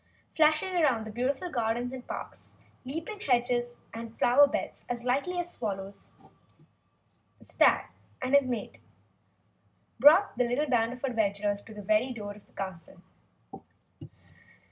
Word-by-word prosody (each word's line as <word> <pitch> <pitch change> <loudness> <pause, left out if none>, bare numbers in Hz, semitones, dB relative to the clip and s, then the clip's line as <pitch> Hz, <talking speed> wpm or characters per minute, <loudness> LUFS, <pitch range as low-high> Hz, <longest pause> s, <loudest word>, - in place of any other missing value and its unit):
Flashing 310 +3 +4
through 295 -11 +2
the 220 - -7
beautiful 265 - -2
gardens 240 0 -1
and 260 -1 -8
parks, - - -8 0.3
leaping 325 +10 -5
hedges 245 -4 0 0.2
and 230 0 -8
flower 280 +4 +6
beds - - -4
as 240 -1 -3
lightly 280 +9 0
as 350 0 -3
swallows, 195 -3 -5 1.3
the - - -19
stag - - +4 0.3
and 260 +1 -3
his 280 -2 +5
mate 240 -4 -4 1.2
brought 315 - +6
the - - +5
little 285 +5 0
band 235 -3 +2
of 250 - -12
adventurers 205 -5 0
to 220 - -13
the 205 - -8
very 215 +5 +2
door 205 -3 -6
of 205 0 -18
the - - -29
castle. 190 -2 -7
245 Hz, 140 wpm, -29 LUFS, 220-280 Hz, 1.3 s, flower